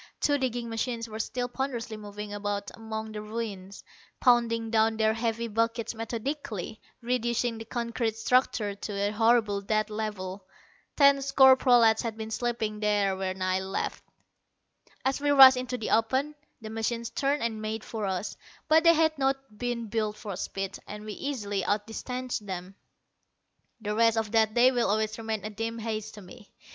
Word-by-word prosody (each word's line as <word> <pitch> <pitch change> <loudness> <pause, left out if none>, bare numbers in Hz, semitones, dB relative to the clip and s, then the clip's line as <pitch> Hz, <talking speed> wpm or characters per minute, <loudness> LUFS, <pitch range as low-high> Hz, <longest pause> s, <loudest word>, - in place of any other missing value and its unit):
Two 290 -1 +2
digging 245 -2 -2
machines 230 +1 -3
were 220 0 -7
still 245 +2 -2
ponderously 245 -3 -4
moving 210 0 -7
about 205 0 -3
among 220 -1 -6
the 210 -1 -5
ruins, 210 -3 -6 0.4
pounding 230 -2 +3
down 220 0 +3
their 220 0 +3
heavy 230 0 -2
buckets 230 +1 -1
methodically, 225 - -5 0.2
reducing 240 -1 0
the 225 - -7
concrete 235 -1 -2
structure 225 -3 +1
to 205 +1 -6
a 200 +1 0
horrible 220 -2 +3
dead 215 +2 0
level. 205 -3 -4 0.5
Ten 280 -1 +6
score 265 -1 +6
prolats 240 -4 +5
had 225 -2 -4
been 220 0 -6
sleeping 220 -3 -2
there 205 -2 +2
when 190 0 -3
I 185 0 +1
left. 190 0 -3 1.0
As 270 +1 0
we 290 - +1
rushed 265 -2 +10
into 250 0 -3
the 220 - -4
open, 260 +7 +2 0.3
the 215 0 -7
machines 230 +1 -2
turned 280 -1 0
and 220 -2 -2
made 215 0 -3
for 215 -3 -4
us; 190 +2 -3 0.3
but 320 +1 +5
they 335 0 +7
had 315 0 +3
not 270 -3 -1
been 240 +1 -3
built 215 -1 -2
for 205 -3 -6
speed, 195 +1 -4
and 210 +1 -8
we 215 - -5
easily 205 -8 -3
outdistanced 225 +3 -3
them. 185 0 -5 1.1
The 210 -1 -3
rest 230 +1 +3
of 220 -2 -1
that 220 -1 +3
day 250 +2 +6
will 240 -5 +1
always 215 +1 0
remain 220 -2 -3
a 215 - -4
dim 225 +2 -4
haze 220 -1 -3
to 210 - -11
me. 205 +4 -14
225 Hz, 170 wpm, -28 LUFS, 210-240 Hz, 1.1 s, rushed